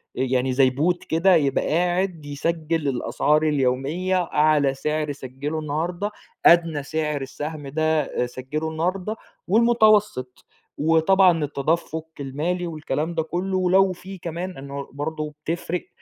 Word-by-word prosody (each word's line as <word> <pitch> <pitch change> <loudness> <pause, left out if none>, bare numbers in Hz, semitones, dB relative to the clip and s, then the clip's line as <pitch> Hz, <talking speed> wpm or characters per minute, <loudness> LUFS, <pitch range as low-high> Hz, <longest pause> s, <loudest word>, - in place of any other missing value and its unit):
يعني 130 0 0
زي 130 0 +4
Bot 170 +7 0
كده 175 +3 +4
يبقى 140 -4 +1
قاعد 175 0 0
يسجِّل 160 +1 -2
الأسعار 150 +4 +1
اليومية 150 +6 +1
أعلى 150 -3 +2
سعر 150 +2 -2
سَجِّلُه 140 +3 -5
النّهارده، 170 +7 -2 0.3
أدنى 165 -4 +5
سعر 150 -1 -2
السَّهم 145 +2 -6
ده 155 -2 0
سَجّلُه 135 +6 -4
النّهارده، 185 +6 -2 0.3
والمتوسط 215 - +3 0.3
وطبعًا 165 +2 +4
التدفُّق 160 +3 -1
المالي 160 +6 -2
والكلام 155 0 -3
ده 160 - +1
كُلّه، 185 +3 -2
ولو 185 +1 +4
في 190 +2 -10
كمان 175 +1 -5
إنه 140 0 -7
برضه 150 +1 -4
بتفرِق 170 +1 -3
155 Hz, 120 wpm, -23 LUFS, 145-175 Hz, 0.3 s, أدنى